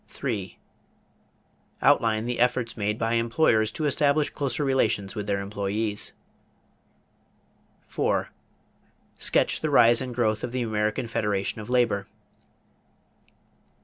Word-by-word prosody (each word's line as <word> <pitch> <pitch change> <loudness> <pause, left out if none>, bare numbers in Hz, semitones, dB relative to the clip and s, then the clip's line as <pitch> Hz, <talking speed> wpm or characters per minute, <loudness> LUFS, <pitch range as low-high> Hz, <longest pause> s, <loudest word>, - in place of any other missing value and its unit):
3. 105 -9 -4 1.3
Outline 110 -1 +3
the 120 0 -3
efforts 125 -1 +1
made 105 0 -1
by 115 0 -1
employers 115 -1 +2
to 155 - -3
establish 145 +1 +2
closer 140 0 -2
relations 115 -7 +1
with 105 -1 -5
their 100 -1 0
employees. 105 +1 -2 1.7
4. - - -1 0.9
Sketch - - +1
the 155 - -1
rise 120 -4 +5
and 125 -2 -5
growth 110 -3 0
of - - -3
the 125 0 -1
American 110 0 -1
Federation 105 -2 -2
of 105 - -10
Labor. 120 -6 +1
115 Hz, 115 wpm, -26 LUFS, 105-125 Hz, 1.7 s, rise